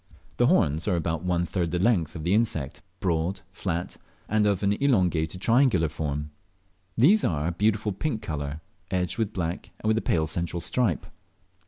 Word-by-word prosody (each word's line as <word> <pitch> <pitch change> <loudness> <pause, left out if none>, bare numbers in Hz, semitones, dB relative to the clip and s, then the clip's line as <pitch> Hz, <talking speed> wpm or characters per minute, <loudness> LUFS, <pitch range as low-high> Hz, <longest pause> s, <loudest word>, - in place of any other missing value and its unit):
The - - +4
horns 75 +6 +2
are 95 - +2
about 80 -1 -1
one 90 -1 0
third 85 -1 -1
the 90 - -1
length 90 -5 +1
of 80 - -5
the 90 +3 +1
insect, 90 - 0 0.2
broad, 85 +1 -1
flat, 90 -3 -3 0.3
and 105 0 +2
of 100 -1 0
an 100 0 +3
elongated 90 - +1
triangular 115 - +3
foam. 75 -2 -3 0.7
They 145 - +7
are 75 -3 0
of - - +1
a 85 - -5
beautiful 105 +2 +1
pink 110 +3 -3
colour, 75 -1 -4 0.3
edged 90 +3 -1
with 110 -2 0
black, 85 -3 -3
and - - -4
with 110 +1 +3
a - - -6
pale 80 -2 +1
central 85 +2 -2
stripe. 95 - 0
90 Hz, 180 wpm, -26 LUFS, 80-105 Hz, 0.7 s, They